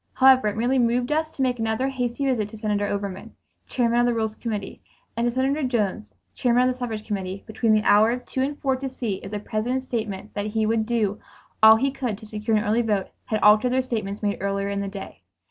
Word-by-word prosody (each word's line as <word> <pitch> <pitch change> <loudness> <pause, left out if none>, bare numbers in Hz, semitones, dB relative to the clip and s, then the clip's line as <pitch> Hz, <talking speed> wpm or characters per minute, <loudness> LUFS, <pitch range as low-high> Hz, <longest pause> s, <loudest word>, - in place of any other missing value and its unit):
However, 260 -3 +5
it 210 0 -2
merely 250 +3 +2
moved 245 +2 +1
us 310 +1 +1
to 270 - -1
make 250 -2 0
another 225 +3 0
hasty 250 0 -2
visit 230 -6 0
to 220 - -10
Senator 210 -1 -1
Overman, 200 -2 -5 0.3
Chairman 240 -2 +1
of 240 - +4
the 240 - +1
Rules 220 -1 -1
Committee, 215 -3 -5 0.3
and 235 +1 0
to - - +1
Senator 265 +4 0
Jones, 205 - -1 0.2
Chairman 245 0 +2
of - - 0
the 255 - -17
Suffrage 220 -4 -4
Committee, 195 -2 -4
between 225 0 0
the 215 0 +3
hours 220 +4 +4
of - - -26
two 260 - -3
and 285 +2 -1
four 265 -1 +1
to 270 +1 -4
see 235 -6 -3
if 195 - -9
the 210 - -3
President's 240 +5 -2
statement 215 -4 -4
that 205 0 -3
he 220 +1 0
would 220 0 +1
do 220 -4 0 0.4
all 220 0 +9
he 270 +5 +1
could 250 -6 -3
to 215 - -12
secure 215 +1 -1
an 210 - 0
early 220 +3 +2
vote 210 -4 -1 0.2
had 215 - -1
altered 215 +4 +5
their 260 0 +2
statements 215 -5 -4
made 205 -1 -1
earlier 200 0 -1
in 200 0 -2
the 200 - -3
day. 195 0 -8
225 Hz, 235 wpm, -24 LUFS, 210-250 Hz, 0.4 s, all